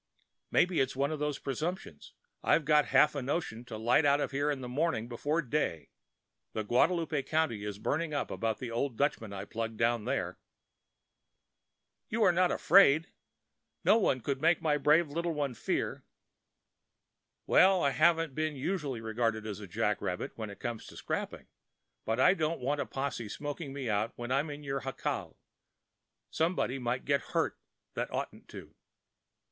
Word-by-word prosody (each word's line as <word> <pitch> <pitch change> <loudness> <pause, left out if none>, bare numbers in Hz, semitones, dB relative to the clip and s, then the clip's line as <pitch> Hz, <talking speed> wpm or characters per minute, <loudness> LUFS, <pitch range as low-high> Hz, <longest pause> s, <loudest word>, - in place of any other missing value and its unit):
Maybe 180 -1 +3
it's 135 - +1
one 140 +3 0
of 155 - -3
them 150 0 0
presumptions. 150 - -4 0.3
I've 160 - +3
got 150 0 +4
half 150 - +5
a 140 - -3
notion 125 -4 -3
to 115 -3 -7
light 120 +7 +3
out 145 0 +4
in 145 0 -1
the 125 - -5
morning 130 -3 -1
before 145 +7 -1
day. 115 - -2 0.6
The 110 - -2
Guadalupe 155 - +2
country 140 -7 0
is 105 -1 -4
burning 155 +9 -1
up 145 - -2
about 110 -2 -1
that 120 -2 -6
old 120 +1 -2
Dutchman 125 -7 0
I 100 -1 -5
plugged 115 -1 -4
down 115 -1 +1
there." - - -2 1.7
"You 225 +1 +1
are 185 - +6
not 180 +1 +3
afraid—no 175 +3 +2
one 130 - +1
could 135 +2 -2
make 165 +2 +4
my 150 -2 +1
brave 150 +4 +4
little 165 +3 -2
one 140 -3 -1
fear." - - -2 1.4
"Well, 190 -1 +5
I 140 - +3
haven't 165 +2 +3
been 155 +1 -1
usually 140 -4 -2
regarded 110 -1 -1
as 105 -1 -5
a 100 - -8
jack 85 - 0
rabbit - - -3
when 110 -2 -5
it 100 - -10
comes 120 -2 -5
to - - -12
scrapping; - - -4 0.6
but 110 +2 -1
I 180 +8 +6
don't 160 -3 -1
want 140 +3 -1
a - - -4
posse 135 -5 -3
smoking 145 +3 -5
me 135 -2 -5
out 105 +1 0
when 120 +1 -6
I'm 140 +4 +1
in 145 0 -7
your 135 -1 -2
jacal. 135 0 -4 0.9
Somebody 160 -5 0
might 125 0 -2
get 140 0 +2
hurt - - -1 0.3
that - - -2
oughtn't - - -5
to." - - -11
140 Hz, 165 wpm, -31 LUFS, 120-155 Hz, 1.7 s, are